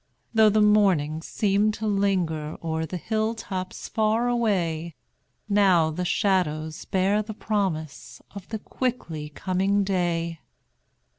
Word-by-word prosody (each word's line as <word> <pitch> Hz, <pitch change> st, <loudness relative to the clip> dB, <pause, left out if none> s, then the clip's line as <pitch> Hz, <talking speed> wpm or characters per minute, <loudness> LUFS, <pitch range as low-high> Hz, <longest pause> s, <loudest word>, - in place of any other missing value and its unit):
Though 220 Hz, -1 st, +6 dB
the 210 Hz, +1 st, +3 dB
morning 185 Hz, -8 st, +3 dB
seemed 210 Hz, +4 st, +1 dB
to 220 Hz, -, -5 dB
linger 185 Hz, -7 st, 0 dB
O'er 160 Hz, 0 st, -2 dB
the 180 Hz, -, -4 dB
hill 220 Hz, +4 st, -1 dB
tops 185 Hz, -4 st, -5 dB
far 220 Hz, +2 st, +1 dB
away, 175 Hz, -9 st, 0 dB, 0.5 s
Now 190 Hz, -6 st, +4 dB
the 180 Hz, +3 st, -3 dB
shadows 160 Hz, -5 st, 0 dB
bear 195 Hz, +2 st, +1 dB
the 215 Hz, 0 st, -7 dB
promise 185 Hz, -10 st, -3 dB
Of 195 Hz, -2 st, -10 dB
the 220 Hz, -, -3 dB
quickly 190 Hz, -, -4 dB
coming 190 Hz, +5 st, 0 dB
day. 170 Hz, -4 st, -1 dB
190 Hz, 125 wpm, -25 LUFS, 165-210 Hz, 0.5 s, Though